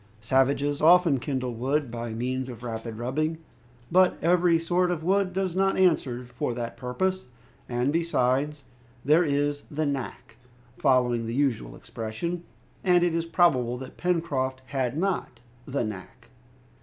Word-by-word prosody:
Savages 140 +4 +1
often 165 -3 +5
kindle 130 -1 -3
wood 135 +3 -1
by 115 0 -4
means 130 +3 -2
of 120 -1 -9
rapid 115 -1 -5
rubbing. 155 +7 -1 0.5
But 185 +1 +4
every 175 0 +3
sort 175 +2 +1
of 170 -3 -2
wood 190 +1 +2
does 185 -1 -2
not 195 0 +2
answer 135 -9 +2
for 120 0 -3
the 115 -1 -4
purpose, 185 +9 -2 0.4
and 125 +3 0
besides, 150 -3 0 0.4
there 155 +5 +5
is 145 -1 0
"the 155 +1 -1
knack," 135 -4 -5 0.4
following 125 -4 +2
the 115 - -3
usual 130 - 0
expression, 165 +11 -5 0.4
and 180 -1 +4
it 175 -2 +2
is 165 0 0
probable 130 -9 +2
that 130 0 -10
Pencroft 140 -7 -1
had 130 0 -2
not 180 -9 -2 0.3
"the 135 -2 -1
knack." 110 +3 -8
140 Hz, 145 wpm, -26 LUFS, 125-170 Hz, 0.5 s, often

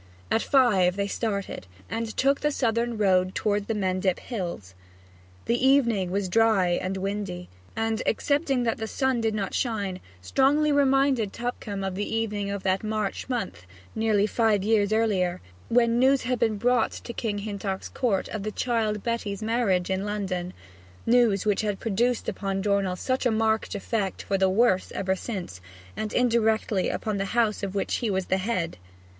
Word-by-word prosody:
At 225 - +3
five 205 -10 +3
they 200 0 0
started, 200 - -3 0.2
and 225 0 -4
took 275 +1 +3
the 295 - +2
southern 235 -4 0
road 185 -2 +2
toward 205 -1 0
the 225 - -1
Mendip 185 -2 0
Hills. 175 - -5 0.7
The 240 +2 0
evening 235 -9 +3
was 195 +1 -1
dry 215 -2 +3
and 185 +2 -1
windy, 195 -2 -4 0.3
and, 225 0 -1
excepting 275 +1 +1
that 230 -1 -1
the 220 - -3
sun 265 0 0
did 220 -1 0
not 195 -2 -3
shine, 200 -6 -1 0.2
strongly 280 - +2
reminded 270 -6 +3
Tupcombe 225 -4 -4
of 190 -1 -2
the 205 +3 -3
evening 210 -3 -1
of 200 -1 -4
that 190 +1 +1
March 215 +1 -2
month, 230 - -4 0.3
nearly 220 -2 +2
five 215 -2 +2
years 210 -1 +2
earlier, 195 -5 +1 0.3
when 235 0 +3
news 265 +1 +4
had 250 -1 -1
been 220 -2 +1
brought 245 +1 +2
to 235 - -7
King's 205 -3 -3
Hintock 200 -2 -4
Court 215 -7 0
of 215 - -4
the 215 +2 -3
child 220 -3 -1
Betty's 220 -3 -2
marriage 210 -6 +1
in 190 +1 0
London 190 -4 -3 0.5
news 230 -5 +3
which 205 -2 +2
had 205 -2 -2
produced 235 +3 0
upon 195 -1 -2
Dornell 200 -3 +1
such 255 +7 0
a - - +1
marked 220 -1 0
effect 200 -1 -2
for 195 -1 -1
the 190 0 +4
worse 190 -1 +2
ever 190 -1 0
since, 185 - -6 0.3
and 215 -1 -3
indirectly 220 -5 +2
upon 215 -2 -2
the 195 - -1
household 210 -4 +1
of 190 - -10
which 195 - 0
he 235 - -1
was 190 -2 0
the 190 - +1
head. 185 -4 -2
215 Hz, 170 wpm, -26 LUFS, 195-235 Hz, 0.7 s, news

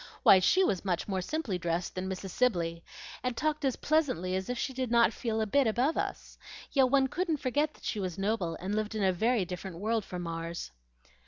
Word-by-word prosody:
Why, 190 - +8
she 370 - +4
was 195 - 0
much 180 -3 -1
more 190 -2 -1
simply 230 - -2
dressed 170 0 -2
than 185 +1 -3
Mrs. 190 0 -5
Sibley, 170 -9 0 0.4
and 250 -2 -2
talked 305 0 0
as 265 -3 +1
pleasantly 255 - 0
as 190 +3 -3
if 250 - -2
she 265 - -2
did 255 -1 -2
not 235 -1 +4
feel 225 -2 -2
a - - +1
bit 265 +5 +3
above 250 +8 +1
us. - - -4 0.3
Yet 265 -3 +4
one 270 0 +4
couldn't 335 +2 -1
forget 290 +3 0
that - - -20
she 215 - -2
was 185 -3 -3
noble, 195 -4 -1
and 190 +3 -3
lived 215 +1 -1
in 215 - 0
a 190 -1 +3
very 220 +2 +1
different 180 0 -6
world 220 +3 0
from 180 -2 -6
ours." 165 - -5
215 Hz, 220 wpm, -30 LUFS, 185-255 Hz, 0.4 s, Why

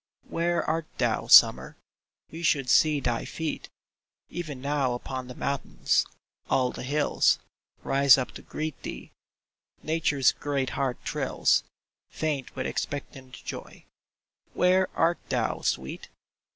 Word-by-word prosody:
Where 170 +1 0
art 165 -1 -1
thou, - - 0
Summer? - - +6 0.5
We 165 - -7
should 140 -6 +2
see 155 -2 +4
thy 120 -3 -1
feet 160 -1 -5 0.6
Even 155 -6 -5
now 140 -2 0
upon 130 +1 -6
the 125 - -9
mountains. 140 0 0 0.4
All 125 -1 +2
the - - -8
hills 145 +3 +2 0.5
Rise 140 -1 +6
up 130 - -3
to - - -10
greet 155 -2 -5
thee. - - -8 0.7
Nature's 155 -4 +2
great 140 -3 -2
heart 135 -3 -1
thrills, - - +1 0.5
Faint 150 -4 -3
with 130 - -3
expectant 135 -2 -5
joy. - - -8 0.7
Where 185 +1 +3
art 170 +1 +2
thou, - - -1
sweet 65 +1 -3
140 Hz, 125 wpm, -27 LUFS, 130-155 Hz, 0.7 s, Summer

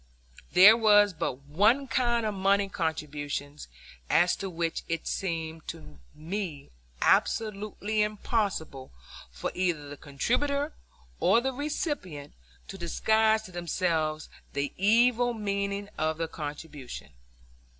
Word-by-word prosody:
There 195 +5 +9
was 205 -3 +5
but 160 -5 -3
one 210 - +2
kind 235 -1 +1
of 215 - -1
money 200 +1 +2
contributions 150 -4 -4 0.4
as 175 +2 +4
to 195 - -4
which 165 -2 -2
it 165 0 -2
seemed 165 -4 -3
to 75 -2 -9 0.2
me 165 -3 -5 0.3
absolutely 215 0 +1
impossible 205 - -2 0.4
for 60 - -5
either 170 -5 -1
the 145 - -8
contributor 280 - -1 0.5
or 230 - +4
the 265 +2 -2
recipient 285 - -4 0.4
to 195 - -8
disguise 220 +5 +2
to 185 - -11
themselves 165 -3 -1 0.3
the 140 0 -2
evil 240 +4 +3
meaning 200 -1 -2
of 155 0 0
the 165 0 -2
contribution. 150 -3 -8
190 Hz, 115 wpm, -28 LUFS, 155-220 Hz, 0.5 s, There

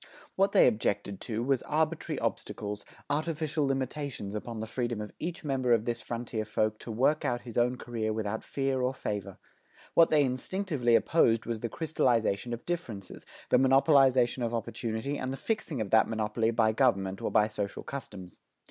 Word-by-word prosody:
What 195 +1 +3
they - - +6
objected 105 -4 0
to 115 0 -3
was 135 -1 +1
arbitrary 155 +1 -1
obstacles, 105 0 -3 0.2
artificial 155 0 -1
limitations 135 -5 -3
upon 110 +1 -5
the 110 - -3
freedom 120 0 -2
of 105 0 -6
each 170 +1 -4
member 130 -4 +1
of 115 -1 +2
this 120 0 -2
frontier 115 -2 -4
folk 110 0 -1
to 115 - -7
work 135 +7 +2
out 120 0 0
his 120 -3 -10
own 125 +1 +2
career 115 -3 -3
without 110 0 -3
fear 135 -1 -1
or 130 +1 0
favor. 105 -5 -4 0.6
What 165 - +6
they 150 -2 +4
instinctively 130 -1 0
opposed 115 -6 +3
was 115 -2 -3
the 115 - -3
crystallization 120 -8 0
of 120 0 -5
differences, 120 - -5 0.2
the - - +6
monopolization 130 -2 +4
of 120 0 -1
opportunity 115 +4 -3
and 130 - -3
the 135 - -4
fixing 215 - -2
of 100 - -4
that 110 - +5
monopoly 110 0 0
by 115 -1 +3
government 100 -6 +1
or - - -1
by 105 - +4
social 105 -2 -4
customs. 95 -10 -8
120 Hz, 175 wpm, -29 LUFS, 110-140 Hz, 0.6 s, they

